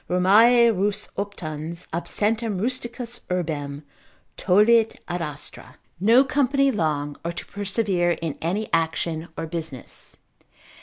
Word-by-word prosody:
Romae 225 +6 +6
rus 205 +2 -1
optans, 170 -4 -5
absentem 210 +5 -1
rusticus 240 +1 -3
urbem 150 -5 -3 0.5
Tollit 215 +4 +4
ad 175 0 -3
astra——— 150 -3 -6 0.2
no 230 +7 +6
company 275 0 +2
long, 150 - -1
or 170 - -2
to 170 - -6
persevere 195 -3 0
in 165 -3 -4
any 195 +7 -1
action 165 0 0
or - - -3
business. 160 -6 -6
185 Hz, 110 wpm, -24 LUFS, 165-225 Hz, 0.5 s, Romae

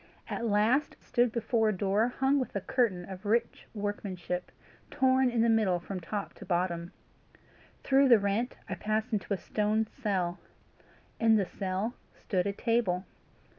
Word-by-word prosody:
At 235 - -2
last 220 +7 +2
I - - -27
stood 240 -1 +2
before 225 -1 +1
a 205 - -1
door 200 +4 +2
hung 270 +3 +1
with 255 - -4
a 200 - -1
curtain 195 -6 0
of 190 +1 -9
rich 230 +3 0
workmanship, 195 -4 -4 0.4
torn 260 -2 +3
in 240 -2 +1
the 230 - +4
middle 215 -6 +3
from 185 +2 -6
top 195 +4 -4
to - - -8
bottom. 175 -2 -1 0.9
Through 275 0 +4
the 235 - +9
rent 205 +4 -1
I 190 - -3
passed 215 +5 -2
into 210 0 -2
a 200 - +2
stone 215 +4 0
cell. 195 -7 -2 0.8
In 225 -1 +5
the 200 -3 +2
cell 190 +5 -3 0.2
stood 185 -2 -1
a - - +1
table. 200 -4 0
210 Hz, 165 wpm, -30 LUFS, 190-235 Hz, 0.9 s, the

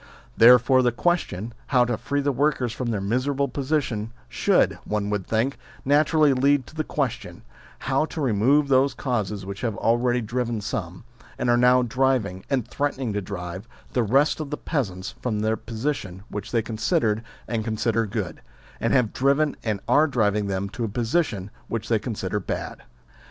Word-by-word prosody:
Therefore 125 +2 +7
the 125 -1 +3
question, 120 - -1
how 125 -3 +4
to 120 -1 -1
free 135 +6 -2
the 140 0 +1
workers 130 -3 0
from 120 0 -3
their 110 -3 -1
miserable 130 +7 0
position, 130 -5 -2 0.2
should, - - +2
one 105 -1 -2
would 105 -3 -2
think, 115 +5 0 0.3
naturally 150 +1 +4
lead 135 +1 +3
to - - -15
the 155 0 -2
question, 140 -6 -3 0.3
how 135 +3 0
to 160 - -7
remove 135 +3 +3
those 135 +1 +3
causes 105 -6 -2
which 100 +1 -6
have 115 -5 -2
already 120 +2 +2
driven 120 0 -2
some, 100 -4 -5 0.3
and 120 - +1
are - - +5
now 125 +1 +5
driving, 120 -6 0
and 130 -5 0
threatening 135 -5 -2
to 105 - -1
drive, 95 +1 -6 0.3
the 125 - +2
rest 135 +9 +2
of 155 -2 -4
the 150 - -3
peasants 95 - -3
from 110 -4 -1
the 110 +1 +1
position 110 -6 -4
which 105 0 -6
they 115 -2 +1
considered 110 - 0 0.3
and 115 -2 -1
consider 115 0 0
good, 100 -4 -4 0.4
and - - 0
have 125 -5 +2
driven 140 +3 +2
and 105 -4 -1
are 155 +2 +5
driving 105 -6 +1
them 100 0 -2
to 115 +4 -5
a - - 0
position 110 - -1 0.2
which 115 -2 -4
they 115 -2 +3
consider 105 -3 -3
bad. 90 - -5
120 Hz, 170 wpm, -24 LUFS, 105-135 Hz, 0.4 s, Therefore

